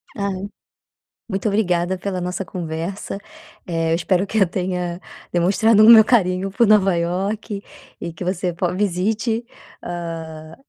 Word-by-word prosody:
Ai, 200 -1 -3 0.8
muito 195 +3 -2
obrigada 185 -3 +1
pela 185 0 -3
nossa 180 +1 -3
conversa, 175 +2 -5 0.5
eh, 165 -2 -1
eu - - +3
espero 180 +3 +1
que 220 - -3
eu 195 - +6
tenha, 180 -1 -3 0.3
demonstrado 205 +5 +4
o - - +8
meu 225 -2 +10
carinho 195 -4 +1
por 235 +3 +3
Nova 195 -3 +4
Iorque 195 +4 -2 0.4
e 170 - -4
que 160 - -8
você, 180 -1 -1
po 170 +1 -1
visite, 210 +5 0 0.4
hã, 165 -2 -6
185 Hz, 140 wpm, -21 LUFS, 175-200 Hz, 0.8 s, meu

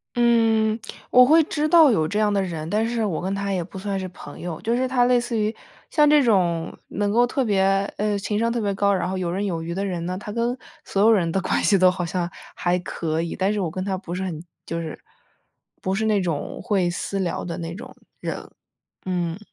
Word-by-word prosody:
嗯， 225 -2 +3 0.3
我 250 - +8
会 315 +4 +6
知 300 0 -1
道 320 -4 +7
有 160 -8 +2
这 205 - -2
样 210 -1 +2
的 200 - +2
人。 165 -4 -4
但 215 +4 +1
是 230 -2 -1
我 175 -5 -2
跟 190 +2 -2
他 200 0 -2
也 180 - -1
不 190 +2 -10
算 195 0 -3
是 185 - -4
朋 - - -11
友， 170 -3 -5
就 230 +1 0
是 255 +1 +1
他 250 -1 +3
类 245 0 +4
似 240 -1 -3
于， 215 +1 0 0.4
像 300 -1 +5
这 295 -1 +6
种 175 -8 +1
能 205 0 -1
够 240 +2 +4
特 265 +1 0
别， 200 -3 +2 0.4
呃， 210 0 0
情 205 +1 -2
商 230 0 +1
特 235 - -1
别 205 -2 0
高， 200 +1 +2
然 180 -2 0
后 190 +1 -2
有 180 -2 -2
刃 195 +3 -1
有 170 -4 -2
余 170 +1 -4
的 195 +3 -2
人 175 -3 -3
呢， 185 0 -3
他 210 +1 -7
跟 235 +3 -1 0.3
所 195 - -1
有 225 - +7
人 175 -6 +2
的 195 - +1
关 - - 0
系 200 - +4
都 185 0 +5
好 180 - -3
像 175 0 -2 0.3
还 180 0 +1
可 165 -2 -2
以。 170 - -4
但 195 +2 +1
是 210 - -1
我 180 - -1
跟 185 +3 -4
他 195 -1 -1
不 180 -2 -6
是 190 - -3
很 170 -3 -5 0.2
就 165 0 -3
是 160 -2 -6 0.8
不 190 - -1
是 220 +3 0
那 215 -2 +3
种 165 -5 -3
会 190 -4 +1
私 195 +3 -3
聊 180 -3 -2
的 170 -1 -4
那 165 0 -5
种 215 - -10 0.2
人， - - -5 0.6
嗯。 175 -2 -2
195 Hz, 260 characters per minute, -23 LUFS, 175-225 Hz, 0.8 s, 我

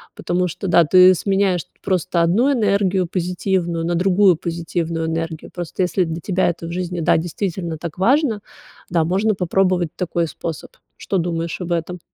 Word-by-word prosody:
потому 180 +1 -1
что 180 +4 -5
да, 170 -2 +5
ты 185 +3 +7
сменяешь 195 -1 +1 0.2
просто 180 -2 0
одну 215 +12 +3
энергию 200 -5 +1
позитивную 175 -1 -1
на 175 - 0
другую 185 0 +4
позитивную 165 -1 -3
энергию. 165 0 -4
Просто 175 +1 -4
если 180 0 +1
для 165 0 -5
тебя 185 -1 +1
это 170 -1 -5
в 170 - -6
жизни, 180 -1 -3
да, - - +3
действительно 170 0 -3
так 165 +1 -7
важно, 245 +2 +2 0.5
да, 170 -2 +2
можно 195 +5 +1
попробовать 180 -1 +1
такой 170 -2 -1
способ. 160 0 -6 0.3
Что 195 - -2
думаешь 170 -1 -2
об 175 0 -4
этом? 170 +2 -3
175 Hz, 165 wpm, -20 LUFS, 170-190 Hz, 0.5 s, ты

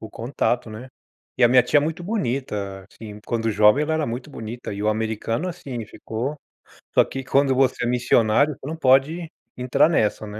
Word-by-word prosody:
o 110 -1 -9
contato, 120 -1 -2
né. 110 +4 -9 0.5
E 125 - +1
a 120 - +6
minha 125 0 +6
tia 145 - +3
muito 160 +4 -3
bonita, 120 - -3
assim, 105 -2 -10
quando 115 -1 -1
jovem, 105 +6 +4
ela 160 - -1
era 155 -2 0
muito 125 +5 -5
bonita 115 -2 -7
e 100 - -5
o 105 - +1
americano, 110 - -2
assim, 135 -10 -6
ficou 120 +7 -5 0.6
só - - +6
que 135 0 -6
quando 135 0 +2
você 130 -2 +1
é - - 0
missionário, 125 +3 +2
você 135 - -9
não 160 - -4
pode 155 +5 +2 0.3
entrar 130 +4 +3
nessa, 110 -7 0
né. 105 +1 -8
125 Hz, 190 wpm, -23 LUFS, 110-140 Hz, 0.6 s, a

